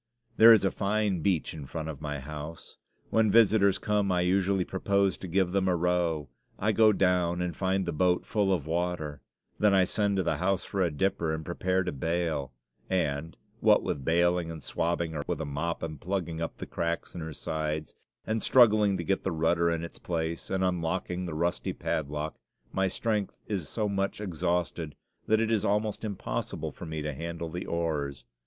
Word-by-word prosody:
There 115 Hz, +1 st, +10 dB
is 110 Hz, -3 st, +6 dB
a 95 Hz, -, +2 dB
fine 105 Hz, -2 st, 0 dB
beach 85 Hz, -1 st, 0 dB
in 75 Hz, -4 st, -8 dB
front 80 Hz, +2 st, -5 dB
of 75 Hz, -2 st, -6 dB
my 75 Hz, -1 st, -3 dB
house. 75 Hz, +3 st, -8 dB, 0.3 s
When 110 Hz, -1 st, +4 dB
visitors 100 Hz, -2 st, +5 dB
come 105 Hz, -2 st, +1 dB
I 90 Hz, -1 st, +2 dB
usually 95 Hz, +1 st, +2 dB
propose 100 Hz, 0 st, +1 dB
to 95 Hz, -, -7 dB
give 90 Hz, +1 st, +1 dB
them 95 Hz, 0 st, +1 dB
a 90 Hz, -, +3 dB
row. 85 Hz, -3 st, 0 dB, 0.3 s
I 105 Hz, +2 st, +1 dB
go 110 Hz, +1 st, +6 dB
down 90 Hz, -3 st, +2 dB
and 90 Hz, -2 st, -2 dB
find 95 Hz, +1 st, 0 dB
the 85 Hz, -, -2 dB
boat 90 Hz, +3 st, +2 dB
full 100 Hz, -3 st, +1 dB
of 85 Hz, -7 st, 0 dB
water; 80 Hz, -3 st, -2 dB, 0.4 s
then 105 Hz, -2 st, +4 dB
I 95 Hz, -, +6 dB
send 100 Hz, +2 st, +1 dB
to 95 Hz, -, +2 dB
the 85 Hz, -, 0 dB
house 95 Hz, 0 st, 0 dB
for 100 Hz, -, -2 dB
a 90 Hz, -, +3 dB
dipper 80 Hz, +1 st, 0 dB
and 80 Hz, 0 st, -7 dB
prepare 90 Hz, +2 st, 0 dB
to -, -, -2 dB
bail; 80 Hz, -2 st, -1 dB, 0.4 s
and, 80 Hz, -4 st, -1 dB, 0.2 s
what -, -, +5 dB
with 70 Hz, -, -2 dB
bailing 85 Hz, +2 st, +2 dB
and 80 Hz, -3 st, -7 dB
swabbing 85 Hz, +3 st, -1 dB
her 75 Hz, -2 st, -3 dB
with -, -, -2 dB
a -, -, -2 dB
mop 80 Hz, +4 st, -3 dB
and 80 Hz, -4 st, -5 dB
plugging 85 Hz, -3 st, -2 dB
up 80 Hz, -, -4 dB
the -, -, -6 dB
cracks 85 Hz, 0 st, -3 dB
in 85 Hz, -, -6 dB
her 80 Hz, 0 st, -5 dB
sides, 75 Hz, 0 st, -3 dB, 0.3 s
and 110 Hz, 0 st, -1 dB
struggling 110 Hz, -5 st, +5 dB
to 85 Hz, -, -3 dB
get 95 Hz, +3 st, 0 dB
the 95 Hz, -, -1 dB
rudder 85 Hz, +1 st, +2 dB
in 85 Hz, 0 st, -1 dB
its 85 Hz, -, -8 dB
place, 85 Hz, -1 st, -3 dB
and 95 Hz, 0 st, 0 dB
unlocking 90 Hz, 0 st, -1 dB
the 80 Hz, -, -5 dB
rusty 85 Hz, +2 st, -1 dB
padlock, 75 Hz, +1 st, -3 dB, 0.3 s
my 95 Hz, 0 st, +2 dB
strength 105 Hz, +1 st, -1 dB
is 95 Hz, -8 st, -3 dB
so 110 Hz, -2 st, -1 dB
much 100 Hz, -1 st, -1 dB
exhausted 85 Hz, -4 st, -2 dB, 0.3 s
that 110 Hz, 0 st, +4 dB
it 115 Hz, 0 st, +1 dB
is 110 Hz, -3 st, +2 dB
almost 105 Hz, +1 st, 0 dB
impossible 95 Hz, -, -3 dB
for 85 Hz, -, -9 dB
me 80 Hz, -1 st, -4 dB
to 75 Hz, 0 st, -2 dB
handle 85 Hz, +3 st, -5 dB
the 90 Hz, +3 st, -5 dB
oars. 75 Hz, -6 st, -2 dB
90 Hz, 195 wpm, -29 LUFS, 80-95 Hz, 0.4 s, There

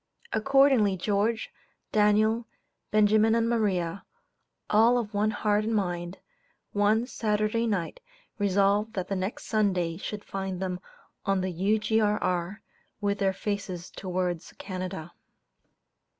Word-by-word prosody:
Accordingly 265 Hz, -5 st, +4 dB
George, 210 Hz, +4 st, 0 dB, 0.4 s
Daniel, 215 Hz, +2 st, +3 dB, 0.4 s
Benjamin 215 Hz, +1 st, +4 dB
and 230 Hz, 0 st, +2 dB
Maria, 200 Hz, -6 st, 0 dB, 0.6 s
all 230 Hz, +3 st, +5 dB
of 225 Hz, -3 st, -3 dB
one 210 Hz, +1 st, +2 dB
heart 210 Hz, -1 st, +1 dB
and 225 Hz, +1 st, -1 dB
mind, 175 Hz, -2 st, -2 dB, 0.5 s
one 210 Hz, +3 st, +2 dB
"Saturday 215 Hz, -1 st, 0 dB
night" 200 Hz, -, -2 dB, 0.4 s
resolved 200 Hz, +2 st, +2 dB
that 185 Hz, -2 st, -3 dB
the 195 Hz, -, 0 dB
next 190 Hz, +3 st, -3 dB
Sunday 185 Hz, -6 st, +1 dB
should 205 Hz, +2 st, -6 dB
find 190 Hz, -2 st, -4 dB
them 185 Hz, -1 st, -3 dB, 0.4 s
on 195 Hz, -1 st, +1 dB
the 185 Hz, 0 st, -2 dB
U.G.R.R., 205 Hz, -1 st, 0 dB, 0.4 s
with 200 Hz, -1 st, -1 dB
their 195 Hz, -1 st, +2 dB
faces 190 Hz, -3 st, -4 dB
towards 180 Hz, -3 st, -3 dB
Canada. 180 Hz, -3 st, -6 dB
205 Hz, 115 wpm, -27 LUFS, 185-215 Hz, 0.6 s, all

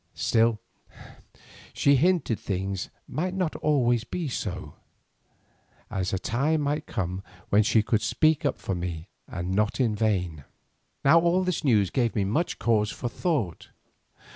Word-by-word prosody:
Still, 115 Hz, -1 st, +2 dB, 1.1 s
she 140 Hz, -, +4 dB
hinted, 160 Hz, -, +2 dB
things 95 Hz, -1 st, -3 dB, 0.2 s
might 180 Hz, +4 st, -2 dB
not 180 Hz, -4 st, -1 dB
always 120 Hz, -6 st, +2 dB
be 170 Hz, +5 st, -4 dB
so, 90 Hz, -, -4 dB, 1.2 s
as 95 Hz, -1 st, -1 dB
a 95 Hz, -, 0 dB
time 145 Hz, +10 st, 0 dB
might 145 Hz, +1 st, -1 dB
come 90 Hz, 0 st, -3 dB, 0.3 s
when 105 Hz, +1 st, +5 dB
she 110 Hz, +1 st, +3 dB
could 110 Hz, 0 st, +1 dB
speak 155 Hz, +5 st, +2 dB
up -, -, 0 dB
for 95 Hz, -, -3 dB
me 85 Hz, -2 st, -5 dB, 0.2 s
and 90 Hz, +1 st, -4 dB
not 105 Hz, +5 st, 0 dB
in 120 Hz, -4 st, +2 dB
vain. 90 Hz, -8 st, -1 dB, 0.6 s
Now 160 Hz, +5 st, +7 dB
all 175 Hz, +2 st, +2 dB
this 180 Hz, -2 st, -1 dB
news 105 Hz, -, +3 dB
gave 120 Hz, -4 st, 0 dB
me 105 Hz, -, +1 dB
much 115 Hz, -, -1 dB
cause 105 Hz, -3 st, +2 dB
for 120 Hz, -, -4 dB
thought. 125 Hz, -, -2 dB
115 Hz, 145 wpm, -26 LUFS, 95-150 Hz, 1.2 s, Now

